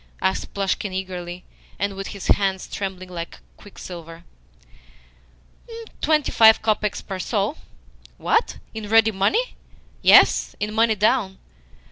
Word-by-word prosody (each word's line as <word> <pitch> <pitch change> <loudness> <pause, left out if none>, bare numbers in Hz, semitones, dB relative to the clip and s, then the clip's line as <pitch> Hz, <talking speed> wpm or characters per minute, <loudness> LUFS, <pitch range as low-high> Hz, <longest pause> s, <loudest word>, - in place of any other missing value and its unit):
asked 190 +1 -1
Plushkin 200 0 -1
eagerly, 180 -1 -6 0.3
and 200 0 -2
with 195 0 -6
his 200 - -8
hands 195 -2 +1
trembling 190 -2 -5
like 170 -2 -7 0.2
quicksilver. 170 -4 -11 1.8
"Twenty 305 -2 +2
five 220 -1 +6
kopecks 215 -1 -1
per 190 -1 -5
soul." - - -1 0.6
"What? - - 0 0.2
In 220 -2 -7
ready 225 0 +5
money?" 385 - 0 0.5
"Yes - - +5
in 210 +1 -3
money 225 0 +3
down." 210 -2 +1
195 Hz, 115 wpm, -22 LUFS, 185-220 Hz, 1.8 s, five